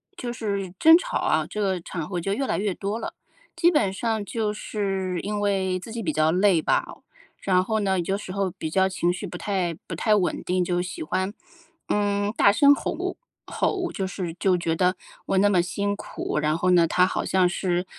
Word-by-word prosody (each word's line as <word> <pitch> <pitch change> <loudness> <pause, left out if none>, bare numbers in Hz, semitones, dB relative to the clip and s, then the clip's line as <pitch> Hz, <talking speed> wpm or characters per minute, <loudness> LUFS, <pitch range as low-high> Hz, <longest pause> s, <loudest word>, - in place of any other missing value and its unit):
就 245 -8 -5
是 200 -5 -3
争 320 +1 +8
吵 - - -2
啊， - - +1
这 210 - -5
个 190 -4 0
场 165 -3 -5
合 180 -3 -3
就 195 - -2
越 270 +4 -1
来 - - -1
越 200 -3 -1
多 205 +3 -3
了， - - -6 0.4
基 340 +1 +4
本 210 - +2
上 220 +1 -2
就 215 0 -2
是 195 -4 -2
因 205 +1 -2
为 190 -2 0
自 220 +5 -10
己 230 -2 -4
比 155 -4 -1
较 155 +1 +3
累 185 -2 +3
吧。 - - +1 0.6
然 185 -1 +2
后 220 +2 -1
呢， 190 -3 +1
有 170 - -2
些 195 +1 0
时 185 - -7
候 195 -2 -1
比 160 - -5
较 190 +3 +3
情 175 -2 0
绪 180 +3 -5
不 180 - -8
太 180 -3 -1
不 165 - -4
太 215 +5 +2
稳 195 -4 +1
定， 180 0 0
就 175 0 0
喜 180 - -6
欢， 185 +5 -2 0.5
嗯， 205 0 0
大 200 - +5
声 280 +7 +6
吼 - - -3 0.3
吼， 370 -3 -1
就 190 - -2
是 180 -3 -5
就 185 +1 +2
觉 165 -1 -1
得 180 +1 +1 0.3
我 195 - 0
那 205 +1 +5
么 180 -3 +4
辛 200 +3 -2
苦， 150 - -5
然 150 +1 +1
后 180 +2 +2
呢， 175 -2 +5
他 180 +3 +3
好 - - -2
像 185 -1 +3
是， 175 0 -1
190 Hz, 235 characters per minute, -25 LUFS, 180-205 Hz, 0.6 s, 争